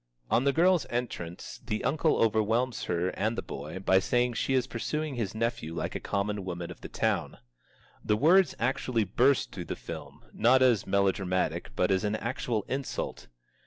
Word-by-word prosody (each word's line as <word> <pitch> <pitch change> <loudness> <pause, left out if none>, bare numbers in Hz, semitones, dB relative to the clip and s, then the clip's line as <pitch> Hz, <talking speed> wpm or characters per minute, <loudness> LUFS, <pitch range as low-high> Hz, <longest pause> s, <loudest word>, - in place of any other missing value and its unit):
On 125 - +3
the 140 - +4
girl's 175 +1 +3
entrance 110 -8 -5
the 110 -3 -3
uncle 155 +2 +2
overwhelms 115 +3 +1
her 90 +1 0
and 110 +4 -1
the - - -2
boy 75 +6 -7
by 95 0 +3
saying 120 +5 +1
she 135 +3 0
is 130 -2 +2
pursuing 150 +5 -3
his 110 -5 -3
nephew 115 -8 -2
like - - -3
a - - -3
common 100 0 -2
woman 85 -2 -5
of - - -12
the - - -7
town. - - -1 0.7
The 105 - +2
words 170 - +5
actually 120 -1 0
burst 125 +7 +2
through - - -6
the - - -4
film, - - -9
not 130 +3 +4
as 120 -5 +3
a - - -11
melodramatic, 95 -1 +1
but 90 - +2
as 95 +1 +2
an 105 0 0
actual 115 -2 -2
insult. 135 0 -4
115 Hz, 180 wpm, -29 LUFS, 95-130 Hz, 0.7 s, words